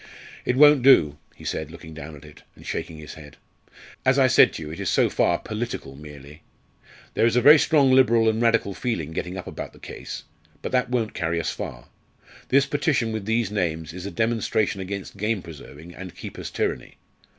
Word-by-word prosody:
"It 125 - +1
won't 145 0 +7
do," 75 - +5 0.2
he - - -14
said, 80 - -3
looking 80 -1 -11
down 75 0 -9
at 75 +1 -14
it, 75 - -15
and - - -16
shaking 80 - -5
his 75 -1 -9
head. 75 -2 -13 0.7
"As 130 +1 +3
I 135 - +5
said 130 -1 +6
to 80 - -6
you, 75 - -7
it 80 - -8
is - - -2
so - - +2
far - - +2
political 110 - -5
merely. 75 +1 -12 0.7
There 115 - +3
is 115 - +1
a 125 - +4
very 150 +4 +8
strong 145 -4 +4
Liberal 120 -3 +4
and 110 +1 +1
Radical 115 -4 +2
feeling 90 - -3
getting 90 +3 -4
up 90 - -6
about - - -7
the - - -17
case. - - -8 0.4
But - - -4
that 125 -1 +1
won't 120 -3 -1
carry 85 -1 -1
us - - -2
far. - - -7 0.6
This 140 +1 +4
petition 145 -5 0
with 110 -3 -4
these 115 -1 0
names 80 -5 -2
is 90 +2 -6
a - - -6
demonstration 110 -3 0
against 100 +1 -6
game 105 -1 -1
preserving 80 +1 -12
and 90 0 -9
keepers' - - -7
tyranny. - - -3
100 Hz, 200 wpm, -24 LUFS, 80-120 Hz, 0.7 s, very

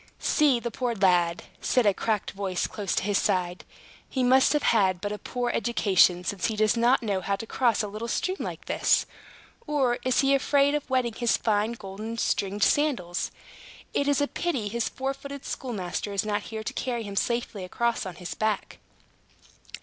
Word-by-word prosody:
"See 290 -6 +3
the 235 0 -4
poor 240 +1 -2
lad," 175 -4 +2 0.2
said 250 -3 +2
a 205 - +5
cracked 215 0 -1
voice 195 -2 -2
close 205 -3 -3
to - - 0
his 205 0 +1
side. 180 -1 -1 0.4
"He 260 - -1
must 260 +1 +5
have 295 - +1
had 190 -5 +3
but 205 +3 -3
a 210 - -4
poor 245 -1 -2
education, 190 -6 +3
since 190 0 -1
he 220 - -2
does 215 +2 +2
not 240 +2 +3
know 200 -4 -1
how 200 +2 0
to 225 - -7
cross 235 -1 +1
a - - -2
little 215 +3 -5
stream 375 +10 -1
like - - -5
this. - - +2 0.6
Or 260 -5 +1
is 255 +1 +2
he 275 0 +3
afraid 280 +1 +3
of 295 -3 -2
wetting 255 -3 +1
his 235 +1 +1
fine 215 +1 +1
golden 215 +1 -7
stringed 200 -2 0
sandals? 245 - +1 0.6
It 285 - +1
is 285 0 +2
a 285 - +2
pity 265 -14 -2
his 235 +2 -1
four 270 +1 -3
footed 280 0 -9
schoolmaster 205 -5 -4
is 200 +1 -1
not 205 -1 -1
here 220 -1 -5
to - - -4
carry 240 -3 -2
him 200 -1 -7
safely 235 -2 -1
across 235 +5 -1
on 185 -3 -6
his 180 -1 -6
back!" 215 -2 -2
225 Hz, 190 wpm, -27 LUFS, 200-255 Hz, 0.6 s, a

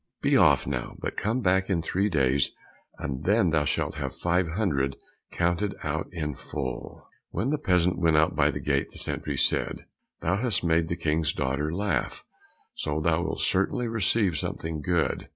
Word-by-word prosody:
Be - - +3
off - - +5
now, 65 -3 -3
but - - -4
come 115 +5 0
back 95 -1 +2
in 85 -4 +1
three 95 +5 0
days, 70 -4 +2 0.5
and 65 +1 -4
then 95 -1 +3
thou 75 -2 +2
shalt - - 0
have 70 -2 -4
five 90 0 +1
hundred 75 -7 0 0.3
counted 90 +4 0
out 80 +1 -2
in 75 -4 -3
full." 65 0 -6 0.2
When 115 +10 -1
the 150 - 0
peasant 90 - +2
went 80 -3 +3
out 80 +1 +3
by - - +4
the - - -3
gate, - - 0
the - - -14
sentry 75 -2 -3
said, - - +1 0.4
"Thou 90 +4 +1
hast 110 -4 +1
made 80 -1 +2
the 85 - -2
King's 80 -3 0
daughter 70 +4 -1
laugh, 100 +4 -2 0.5
so 75 +1 -2
thou 80 +1 +2
wilt 90 - -2
certainly 100 +6 +1
receive 110 -6 +1
something 80 +2 -4
good." 85 +2 0
85 Hz, 175 wpm, -27 LUFS, 75-95 Hz, 0.5 s, off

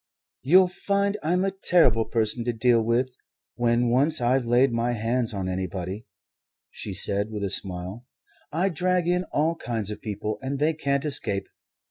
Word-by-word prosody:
"You'll 180 +7 +6
find 200 +2 0
I'm 180 +4 +1
a 195 - 0
terrible 165 - +3
person 115 +1 0
to 120 - 0
deal 115 0 +3
with 120 +3 0 0.4
when 120 0 +1
once 145 +6 +2
I've 125 0 +1
laid 120 +2 +4
my 115 +1 0
hands 115 +1 0
on 95 -3 -3
anybody," 95 +2 -4 0.6
she - - -7
said 100 +1 +1
with 105 -2 -5
a 100 - -2
smile. 95 +5 -4 0.4
"I 175 +5 +1
drag 180 0 0
in 180 +1 +1
all 160 +3 0
kinds 110 -6 -3
of 105 - -7
people, 105 0 -4
and 135 +1 -3
they 150 +3 +2
can't 140 -2 -1
escape. 100 -9 -1
120 Hz, 165 wpm, -25 LUFS, 110-155 Hz, 0.6 s, You'll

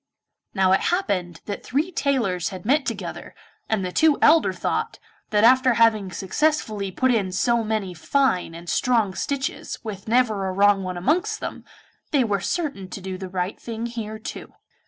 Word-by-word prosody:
Now 190 -1 +3
it 190 - +5
happened 185 - -1
that 205 - -5
three 295 +8 -1
tailors 235 - 0
had 185 -1 -9
met 280 +5 +2
together, - - -5 0.3
and 215 -4 0
the 180 - -3
two 310 - +4
elder 320 +1 +5
thought, - - -2 0.3
that 210 0 +2
after 255 +1 +5
having 220 -4 +3
successfully 205 - -1
put 255 +6 +2
in 200 -5 0
so 235 +5 +1
many 215 -4 -2
fine 180 - 0
and 170 +1 -10
strong 225 -2 +1
stitches 275 +8 -3
with 205 -3 -7
never 220 -4 +2
a 185 - -2
wrong 200 +1 +4
one 185 -1 -4
amongst 360 - 0
them, - - -6 0.4
they 280 -4 +3
were 205 -4 0
certain 280 - -3
to - - -6
do 190 0 -5
the 185 0 -7
right 180 +1 -3
thing 230 0 -5
here 225 -2 -5
too. 215 - -8
215 Hz, 175 wpm, -23 LUFS, 190-260 Hz, 0.4 s, it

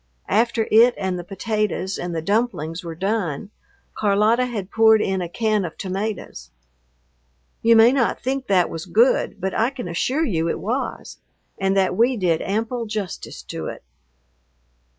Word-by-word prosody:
After 225 +2 +1
it 235 +3 +6
and 190 -2 -2
the - - -6
potatoes 200 -1 -2
and 175 -1 -4
the 160 - -3
dumplings 190 -5 -1
were 165 -1 -6
done, 195 -2 -2 0.4
Carlota 215 +4 +2
had 205 -6 -5
poured 220 -1 +5
in 190 -2 -1
a 175 - -4
can 215 +1 0
of 170 - -6
tomatoes. 190 - -5 1.1
You 230 0 +5
may 225 +2 +7
not 260 -3 +1
think 265 0 -3
that 185 -3 +2
was 165 0 -6
good, - - +2
but 190 0 -2
I 230 +2 +2
can 260 -8 -7
assure 255 - 0
you 165 - 0
it - - -1
was 240 +7 -4 0.4
and 195 0 +1
that 190 -1 +2
we 240 +4 +3
did 175 -5 +1
ample 230 +3 -2
justice 210 -5 -5
to - - -6
it. - - -7
210 Hz, 160 wpm, -22 LUFS, 185-230 Hz, 1.1 s, may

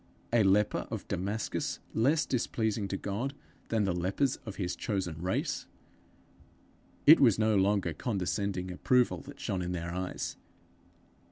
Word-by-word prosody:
a 120 - +5
leper 100 +1 +2
of - - -5
Damascus 100 +5 -2 0.2
less 140 +8 +3
displeasing 110 -4 -1
to 95 - -2
God 120 +10 -3 0.3
than 110 -2 +1
the 95 -2 +1
lepers 95 +10 0
of 105 - -5
his 90 -3 -2
chosen 90 -6 -3
race! 90 +1 -1 1.4
It 155 +3 +9
was 120 -8 +5
no 110 0 +3
longer 95 -3 +2
condescending 95 - -2
approval 125 +7 +2
that 140 0 -12
shone 95 -5 -2
in 90 0 -2
their 85 -1 -4
eyes. 90 0 -4
100 Hz, 140 wpm, -31 LUFS, 90-115 Hz, 1.4 s, It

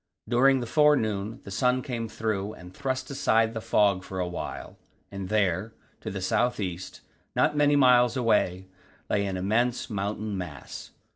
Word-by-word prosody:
During 130 +3 +4
the - - -3
forenoon 115 -7 +2
the 100 - -9
sun 125 +5 +1
came 115 -3 -4
through 105 -2 -2
and 90 -3 -12
thrust 130 +2 -3
aside 115 -4 +2
the 115 - -4
fog 100 -4 +2
for 95 0 -6
a 90 - -1
while; 90 - -6 0.3
and 100 -2 -6
there, 105 +1 0 0.2
to 110 - -6
the 95 -2 -5
south 120 +6 +1
east, 90 -2 -5 0.3
not - - +2
many 145 0 +4
miles 125 -3 +5
away, 100 -6 +1 0.5
lay 100 - +2
an 95 -1 -3
immense 115 +7 0
mountain 105 +1 -3
mass. 90 -7 -7
110 Hz, 160 wpm, -27 LUFS, 95-125 Hz, 0.5 s, miles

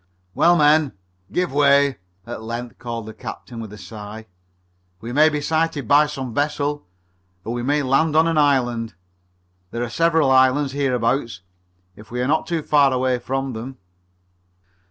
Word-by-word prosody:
"Well, 175 - +4
men, 150 -2 +4 0.4
give 180 -6 -1
way!" 140 -1 +4 0.3
at 120 -1 -7
length 115 +2 -6
called 115 -2 -5
the 110 - -9
captain, 115 +2 -9
with 110 -3 -7
a 105 - -10
sigh. 110 0 -9 0.7
"We 115 +4 -7
may 155 +3 +5
be 150 -1 -3
sighted 160 -4 -1
by 150 +1 +5
some 135 -5 -6
vessel, 145 -2 -1 0.6
or 115 - -3
we 120 - -3
may 145 +4 +1
land 145 +4 +2
on 160 +1 +5
an 165 -2 +1
island. 120 - +1 0.7
There 115 +4 -4
are 120 - -4
several 160 -1 +2
islands 130 +2 +4
hereabouts, 125 -5 -1 0.5
if 105 - -15
we 125 - -4
are 125 - 0
not 155 +2 +1
too 165 -3 -2
far 145 -2 +4
away 130 -1 0
from 135 +1 -3
them." 125 +4 -7
135 Hz, 160 wpm, -21 LUFS, 120-150 Hz, 0.7 s, may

